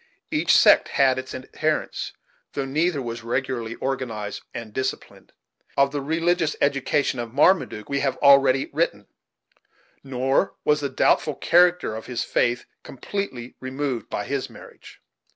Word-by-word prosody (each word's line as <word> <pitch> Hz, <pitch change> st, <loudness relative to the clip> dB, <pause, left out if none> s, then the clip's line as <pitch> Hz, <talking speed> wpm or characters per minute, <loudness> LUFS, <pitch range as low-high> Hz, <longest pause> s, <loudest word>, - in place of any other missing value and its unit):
Each -, -, +4 dB
sect -, -, +6 dB
had 130 Hz, -2 st, +2 dB
its 130 Hz, 0 st, -7 dB
adherents, 155 Hz, +4 st, -3 dB, 0.4 s
though 140 Hz, -, -2 dB
neither 150 Hz, +1 st, 0 dB
was 115 Hz, -1 st, -5 dB
regularly 120 Hz, -1 st, -2 dB
organized 115 Hz, -7 st, -4 dB
and 115 Hz, -2 st, -8 dB
disciplined. 130 Hz, +2 st, -5 dB, 0.5 s
Of 140 Hz, 0 st, +4 dB
the 145 Hz, -1 st, -3 dB
religious 165 Hz, +2 st, 0 dB
education 140 Hz, -1 st, +1 dB
of 120 Hz, +1 st, -6 dB
Marmaduke 150 Hz, -, +2 dB
we 140 Hz, 0 st, -1 dB
have 135 Hz, -2 st, -1 dB
already 135 Hz, -1 st, +5 dB
written, 140 Hz, -10 st, -1 dB, 1.0 s
nor 135 Hz, +6 st, 0 dB
was 150 Hz, 0 st, +3 dB
the 140 Hz, -, -2 dB
doubtful 140 Hz, +2 st, +2 dB
character 175 Hz, -8 st, +3 dB
of 110 Hz, -, -8 dB
his 125 Hz, -2 st, -2 dB
faith 120 Hz, +1 st, 0 dB, 0.2 s
completely 130 Hz, -4 st, -5 dB
removed 130 Hz, -3 st, -4 dB
by -, -, -3 dB
his -, -, -3 dB
marriage. -, -, -14 dB
135 Hz, 135 wpm, -24 LUFS, 125-145 Hz, 1.0 s, sect